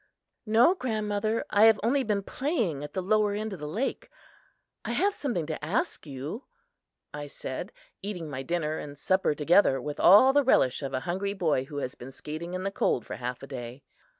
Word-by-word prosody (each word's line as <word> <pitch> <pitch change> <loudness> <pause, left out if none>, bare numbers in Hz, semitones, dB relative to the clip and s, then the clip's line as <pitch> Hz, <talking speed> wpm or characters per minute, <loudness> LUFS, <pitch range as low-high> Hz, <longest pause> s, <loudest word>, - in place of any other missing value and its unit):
"No, 230 +10 +5
grandmother, 215 - -1
I 210 +1 +6
have 225 -2 +6
only 265 +5 +2
been 210 -5 -1
playing 230 - -1
at 145 - -8
the 185 - -2
lower 210 +1 +2
end 215 0 -3
of 190 - -8
the 150 - -5
lake. 220 - -3 0.7
I - - -3
have 405 +1 +2
something 240 - -2
to 155 -1 -5
ask 210 - -2
you," 145 - -6 0.7
I 145 0 -6
said, 140 - -6 0.3
eating 190 -5 -5
my 135 -3 -5
dinner 155 +1 -2
and 145 -1 -8
supper 185 +1 +1
together 150 -2 +4
with 145 +3 -5
all 210 +9 +7
the 285 0 +4
relish 130 - +3
of 135 -2 -3
a 130 - -1
hungry 190 +5 -2
boy 160 -9 0
who 145 +1 -8
has 130 -3 -3
been 130 +2 -10
skating 160 +6 -6
in 185 - -3
the 195 - -1
cold 125 - 0
for - - -6
half 125 0 -5
a - - -7
day. 125 0 -7
180 Hz, 200 wpm, -28 LUFS, 145-215 Hz, 0.7 s, all